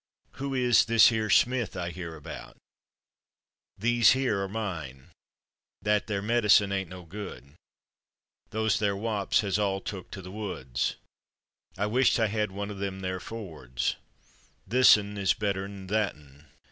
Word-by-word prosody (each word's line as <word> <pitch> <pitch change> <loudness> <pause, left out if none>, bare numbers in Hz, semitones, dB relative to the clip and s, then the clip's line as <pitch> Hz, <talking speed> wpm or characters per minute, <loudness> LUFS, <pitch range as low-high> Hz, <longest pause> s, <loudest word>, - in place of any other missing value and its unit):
Who 140 -1 -2
is 125 -2 +4
/this 115 0 +7
here/ 110 -2 -1
Smith 120 -1 +2
I 85 -1 -3
hear 85 -2 -7
about? 75 - -9 1.2
/These 120 +2 +5
here/ 125 -6 0
are 95 - -2
mine. 85 - -6 0.7
/That 105 0 +2
there/ 100 -2 -2
medicine 105 -3 +4
ain't 95 -1 -2
no 90 0 -9
good. 80 -7 -9 1.0
/Those 110 0 0
there/ 100 -2 +1
wops 105 -1 0
has 100 -1 -1
all 100 -2 0
took 95 -2 -7
to 95 - -8
the 90 - -9
woods. 90 - -3 0.8
I 100 - 0
wisht 125 +4 +3
I 110 -2 +2
had 105 0 -1
one 100 +2 -5
of 100 - -7
/them 95 -1 -4
there/ 95 0 -3
Fords. 85 - -4 0.8
/Thisn/ 105 -5 +5
is 95 -2 +2
better'n 100 -2 -3
/thatn 75 -9 -3
100 Hz, 145 wpm, -28 LUFS, 95-110 Hz, 1.2 s, this